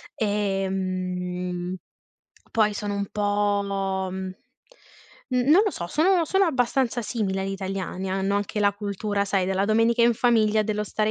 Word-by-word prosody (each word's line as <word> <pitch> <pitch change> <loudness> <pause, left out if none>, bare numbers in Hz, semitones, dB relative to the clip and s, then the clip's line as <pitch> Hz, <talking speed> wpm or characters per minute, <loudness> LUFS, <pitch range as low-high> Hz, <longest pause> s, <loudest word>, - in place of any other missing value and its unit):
Ehm, 185 -3 -2 0.7
poi 215 -2 +2
sono 205 0 -3
un 200 0 -2
po' 200 -2 0
mhmm, 190 0 -5 1.0
n 250 - +1
non 360 +7 +7
lo 415 - +1
so, 170 - -5
sono 340 - +3
sono 385 +5 +2
abbastanza 255 -5 +1
simili 205 -4 -2
agli 195 0 -2
italiani, 190 -1 -4
hanno 195 +1 0
anche 205 +1 -2
la 205 0 +4
cultura, 205 0 -2
sai, 195 -2 +1
della 190 +1 0
domenica 225 +3 +3
in 235 0 +5
famiglia 220 -2 +3
dello 210 0 -2
stare 215 +1 0
205 Hz, 145 wpm, -25 LUFS, 190-220 Hz, 1.0 s, non